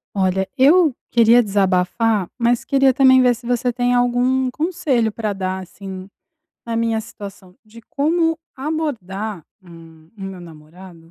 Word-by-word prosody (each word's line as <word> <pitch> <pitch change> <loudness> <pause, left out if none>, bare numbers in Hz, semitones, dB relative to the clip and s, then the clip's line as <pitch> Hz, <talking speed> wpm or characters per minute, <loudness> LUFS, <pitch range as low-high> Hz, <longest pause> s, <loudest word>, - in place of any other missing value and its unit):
Olha, 190 0 0
eu 305 +2 +5 0.2
queria 235 +1 +5
desabafar, 200 0 0
mas 235 0 +1
queria 270 -1 +3
também 260 0 +5
ver 250 -1 +4
se 235 +1 -13
você 245 0 0
tem 245 +1 0
algum 245 +1 +1
conselho 300 -7 -1
pra 215 -1 -3
dar, 190 -1 -4
assim, 185 +1 -9 0.6
na 230 -1 -3
minha 225 -1 0
situação, 195 -4 -11
de 220 +2 -15
como 325 +6 0 0.2
abordar, 220 - -4 0.2
hum, 165 -2 -16
o - - -13
meu 195 -1 -7
namorado 165 +1 -14
225 Hz, 140 wpm, -19 LUFS, 190-255 Hz, 0.6 s, eu